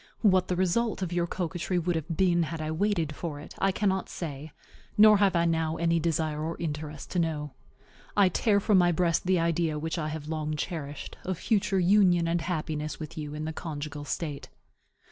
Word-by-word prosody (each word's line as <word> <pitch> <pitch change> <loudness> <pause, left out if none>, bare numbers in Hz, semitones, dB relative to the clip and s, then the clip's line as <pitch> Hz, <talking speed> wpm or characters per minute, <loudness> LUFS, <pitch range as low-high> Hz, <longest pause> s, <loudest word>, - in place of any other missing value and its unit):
What 185 -4 +4
the 180 - 0
result 190 +4 +1
of 180 -1 -3
your 175 -1 +1
coquetry 175 +1 -2
would 175 0 0
have 160 0 -3
been 175 -2 +3
had 165 0 -3
I 155 0 -3
waited 165 -3 0
for 155 -3 -5
it, 145 - -10
I 195 - +3
cannot 190 -1 0
say; 150 -2 -6 0.5
nor 215 0 +8
have 195 -2 +3
I 170 0 +3
now 160 -1 +1
any 170 0 +2
desire 155 -2 -1
or 165 +1 -3
interest 150 -2 -5
to 180 - 0
know. 150 -3 -1 0.7
I 200 -2 +6
tear 200 +3 +2
from 200 -1 +4
my 175 -1 +4
breast 170 +1 +1
the 185 -1 +3
idea 165 -2 +1
which 160 +3 -3
I 155 - -2
have 155 -1 -5
long 155 -1 -2
cherished 150 -2 -5
of 185 -2 -2
future 205 -1 +1
union 180 -2 +4
and 170 0 0
happiness 155 -3 -3
with 155 -1 -7
you 150 -1 -5
in 155 +1 -4
the 160 - -3
conjugal 150 -2 -5
state. 145 -1 -4
165 Hz, 200 wpm, -28 LUFS, 155-185 Hz, 0.7 s, nor